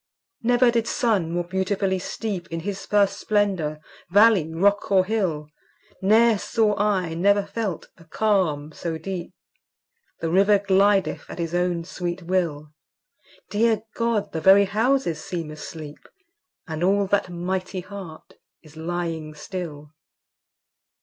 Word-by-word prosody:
Never 245 +1 +4
did 230 -1 0
sun 210 - +1
more 175 +1 -1
beautifully 190 +1 -1
steep 195 -2 -4
In 165 0 -5
his 195 +2 -5
first 205 -1 +2
splendour, 190 -8 0 0.3
valley, 200 -4 +5
rock, 200 +6 +1
or 190 -1 +5
hill; 185 -8 -1 0.6
Ne'er 220 +2 +4
saw 215 -1 +1
I, 190 -5 +1
never 200 +4 +3
felt, 205 -8 -4
a 165 - -17
calm 165 -6 0
so 165 +1 -4
deep! 180 +2 -5 0.9
The 165 - -2
river 200 +3 +5
glideth 195 0 +2
at - - -8
his 170 -1 -3
own 175 -1 0
sweet 175 +1 -5
will: 165 -5 -1 0.8
Dear 220 +1 +2
God! 230 -3 -1
the 160 - -3
very 195 +3 +7
houses 215 - 0
seem 175 -5 -5
asleep; 155 -1 -9 0.6
And 160 0 -4
all 200 +2 +3
that 195 -1 0
mighty 185 +2 -3
heart 185 -4 -10 0.3
is 155 -1 -17
lying 165 -2 -4
still! 150 -2 -7
185 Hz, 130 wpm, -24 LUFS, 165-205 Hz, 0.9 s, very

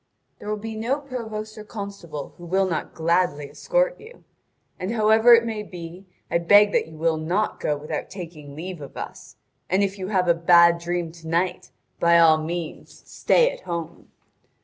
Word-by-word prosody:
There 210 - -7
will 215 - -1
be 220 +1 -6
no 235 +6 -1
provost 220 -6 -6
or - - -8
constable 200 - -7
who 175 - -10
will 190 +2 +2
not 165 -4 -4
gladly 165 -3 +1
escort - - 0
you. 455 +2 -15 0.6
And 185 +3 -3
however 220 +2 +6
it 230 0 +2
may 220 -2 -3
be, 180 -1 -10 0.2
I 170 - +2
beg 205 +4 +6
that - - +1
you 160 -1 -13
will 160 0 +1
not 180 +7 -1
go 150 - -1
without 150 +1 -5
taking 160 -6 -9
leave 175 +1 -7
of 140 - -10
us; - - -8 0.3
and 190 +2 +2
if 195 0 -2
you 185 - -4
have 185 -3 +1
a 170 - +6
bad 170 0 +5
dream 170 -1 -3
to 165 -1 -13
night, 170 -4 -1 0.3
by 170 0 +5
all 160 -2 +6
means 165 +1 -6
stay - - +3
at - - -10
home!" 170 -2 -6
180 Hz, 185 wpm, -24 LUFS, 165-215 Hz, 0.6 s, however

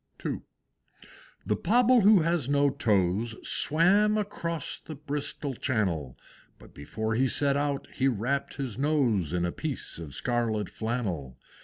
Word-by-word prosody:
II. - - -2 1.0
The - - +1
Pobble 245 +1 +4
who 205 -2 +6
has 165 -5 0
no 140 0 +3
toes, 105 0 +1
Swam 200 +7 +4
across 170 -6 -3
the 155 - -9
Bristol 145 0 -4
Channel; 95 - -2 0.4
But - - -17
before 110 +10 -4
he 130 +4 +2
set 140 +2 +2
out 145 -1 -1
he 135 - +1
wrapped 130 +3 -1
his 130 -5 -5
nose 130 - +1
In 90 0 0
a 85 - -1
piece 145 - -5
of 75 -5 -7
scarlet 115 -3 -1
flannel. 95 - -3
130 Hz, 140 wpm, -28 LUFS, 105-155 Hz, 1.0 s, who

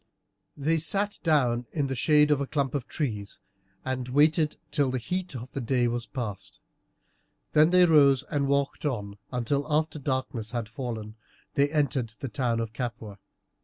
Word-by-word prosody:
They 160 +3 +1
sat 200 +6 0
down 125 -7 +2
in 145 -3 0
the 135 -1 -2
shade 150 +3 +4
of 145 -1 +3
a 140 - -2
clump 140 -3 -1
of 140 -4 -3
trees, 105 -10 -4 0.5
and 130 -1 -3
waited 150 +3 +3
till 145 -3 +2
the 130 - -1
heat 180 +5 -3
of 125 +1 -7
the 135 - -4
day 120 0 +1
was 120 0 -3
past; 115 -7 -6 0.9
then 155 +1 +5
they 180 0 +6
rose 140 -5 +5
and 145 -1 -1
walked 140 0 0
on 105 -8 -3
until, 140 +4 -1
after 155 0 +1
darkness 130 -4 -3
had 120 -3 -2
fallen, 110 -2 -6 0.4
they 140 +1 +3
entered 140 -6 0
the 135 - -4
town 115 0 0
of 115 -1 -3
Capua. 110 -5 -5
135 Hz, 165 wpm, -27 LUFS, 120-150 Hz, 0.9 s, they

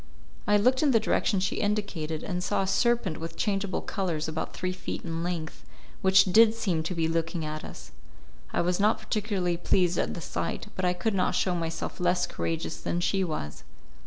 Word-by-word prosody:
I 210 - +5
looked 255 +5 +3
in 300 - +4
the 235 -4 +5
direction 210 -2 +1
she 185 0 -1
indicated, 195 -7 -2
and 180 -2 -3
saw 195 - +1
a - - -3
serpent 205 -3 +1
with 165 0 -6
changeable 195 -2 0
colours 170 -6 -2
about 160 0 -3
three 185 0 -2
feet 185 - -5
in 165 -1 -3
length, 170 -2 -4 0.4
which 190 0 +6
did 220 +4 +6
seem 190 -8 0
to 165 +3 -3
be 165 -1 +1
looking 165 0 -1
at 155 0 -5
us. - - -10 0.6
I - - +1
was 180 +2 0
not 210 +2 +4
particularly 205 -5 -1
pleased 175 0 +2
at - - -1
the - - -5
sight, - - -3
but 185 - -1
I 180 - +3
could 200 +5 -1
not 185 -2 +1
show 185 - +1
myself 165 -1 -3
less 180 0 +2
courageous 165 0 -3
than 175 - -2
she 190 +2 +1
was. 155 - -4
180 Hz, 195 wpm, -28 LUFS, 165-200 Hz, 0.6 s, which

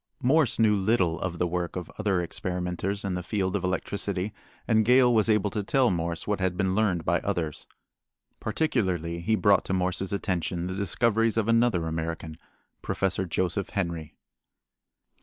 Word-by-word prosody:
Morse 140 0 +3
knew 110 -2 +4
little 95 -5 +1
of 85 -1 -3
the 90 - +1
work 90 0 -2
of 90 -2 -5
other 95 -4 +1
experimenters 90 +3 -3
in 95 - -1
the 90 - -2
field 95 0 -1
of 100 - -1
electricity 95 +1 -2 0.3
and 110 -2 +4
Gale 125 +2 +5
was 110 0 +3
able 105 -2 +2
to 105 - -1
tell 125 +3 +2
Morse 85 -1 -2
what 105 -1 -1
had 95 -1 -1
been 95 -2 +1
learned 95 -5 +1
by - - +2
others. 80 -4 -3 0.7
Particularly 95 - -1
he 110 +6 +1
brought 105 -2 +4
to - - -2
Morse's 95 0 0
attention 90 -3 -2
the 95 - -3
discoveries 115 +3 +1
of 110 -1 +1
another 115 -7 +3
American, 80 0 -4 0.4
Prof. 95 -2 -1
Joseph 95 +3 -1
Henry. 85 -5 -3
95 Hz, 160 wpm, -27 LUFS, 90-110 Hz, 0.7 s, Gale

